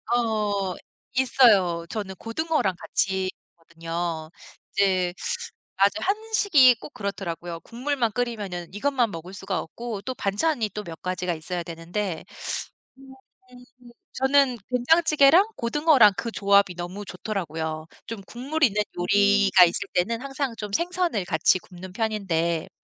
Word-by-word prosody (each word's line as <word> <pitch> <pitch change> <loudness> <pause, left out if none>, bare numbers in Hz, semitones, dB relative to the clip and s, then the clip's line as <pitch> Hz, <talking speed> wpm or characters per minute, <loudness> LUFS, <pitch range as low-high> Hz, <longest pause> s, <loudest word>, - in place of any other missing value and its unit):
어 210 -5 0 0.4
있어요. 210 -10 +4
저는 195 -2 -5
고등어랑 230 - -1
같이 190 -1 -1 0.3
하거든요. 165 -1 -5 0.4
이제 185 -3 +2 0.6
아주 195 +1 +4
한식이 400 - +4
꼭 - - -11
그렇더라고요. 175 -4 -5
국물만 245 -1 -2
끓이면은 205 -8 -4
이것만 245 +1 0
먹을 170 +2 -8
수가 190 -1 -3
없고 225 +4 -6
또 255 - -4
반찬이 220 +4 0
또 210 - -5
몇 165 -3 -9
가지가 180 -1 -2
있어야 170 +2 -4
되는데 170 +2 -4 0.8
음 270 0 -14 0.4
음 250 0 -14 0.2
음. 240 - -14 0.2
저는 265 -1 +3
된장찌개랑 305 +5 +5
고등어랑 260 -3 +5
그 230 - -3
조합이 200 -3 +3
너무 180 +4 -6
좋더라고요. 160 -5 -4 0.2
좀 230 -2 -6
국물이 280 +9 0
있는 210 0 -1 0.2
요리가 200 +1 +5
있을 170 - -1
때는 225 +6 0
항상 275 -2 -3
좀 210 -1 -6
생선을 345 - 0
같이 160 +2 +3
굽는 180 +1 -12
편인데 180 -6 -1
205 Hz, 295 characters per minute, -25 LUFS, 180-250 Hz, 0.8 s, 된장찌개랑